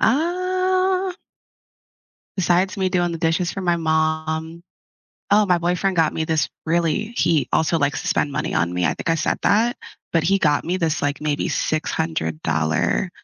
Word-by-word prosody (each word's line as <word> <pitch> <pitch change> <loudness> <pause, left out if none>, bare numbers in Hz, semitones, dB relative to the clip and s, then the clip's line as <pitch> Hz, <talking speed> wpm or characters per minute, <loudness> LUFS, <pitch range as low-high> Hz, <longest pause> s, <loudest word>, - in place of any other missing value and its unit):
Uh. 370 +5 +1 1.2
Besides 185 0 +1
me 190 -1 0
doing 175 -1 +1
the 165 - -4
dishes 165 +1 0
for 195 - -5
my 175 -1 +2
mom 160 0 -1 0.7
Oh, 210 0 +5
my 180 -1 +4
boyfriend 180 +3 0
got 165 -2 +2
me 160 - -1
this 160 -1 +1 0.2
really 170 +7 0
He 160 -4 +2
also 160 +1 +2
likes 140 -1 0
to - - -6
spend 145 - +1
money 150 +2 -3
on 85 0 +1
me, 90 0 0
I - - +3
think - - -5
I 165 - +3
said 155 - 0
that, 230 +4 +3 0.4
but 165 - +2
he 195 +2 +3
got 150 -5 +2
me 180 +2 -1
this, 160 -3 -1
like, 145 0 -1
maybe 150 -1 -1
$600, 80 - -1
170 Hz, 170 wpm, -21 LUFS, 155-195 Hz, 1.2 s, Oh